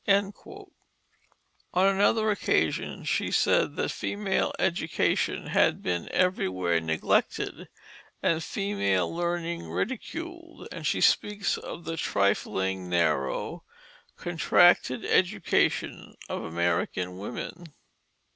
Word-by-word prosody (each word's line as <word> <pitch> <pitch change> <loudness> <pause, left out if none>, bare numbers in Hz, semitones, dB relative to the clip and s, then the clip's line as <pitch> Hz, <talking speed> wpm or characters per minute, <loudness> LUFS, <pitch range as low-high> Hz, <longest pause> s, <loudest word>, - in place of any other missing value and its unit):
On 200 0 0 1.2
another 205 +3 +3
occasion 205 - 0
she - - 0
said - - +2
that - - -1
female 205 -1 -1
education 170 -3 0
had - - +2
been 85 -1 -2
everywhere 95 - +1
neglected, 80 0 -1 0.5
and 165 -1 +1
female 165 - -1
learning 170 0 -2
ridiculed, 335 +7 -5
and - - -4
she - - 0
speaks 210 -1 +2
of 170 - -8
the 165 0 -4
trifling, 95 - 0
narrow, 80 -6 0 0.5
contracted 175 -7 +3
education 185 0 +1
of - - -4
American 85 +2 -1
women. 125 - -6
170 Hz, 90 wpm, -27 LUFS, -, 1.2 s, another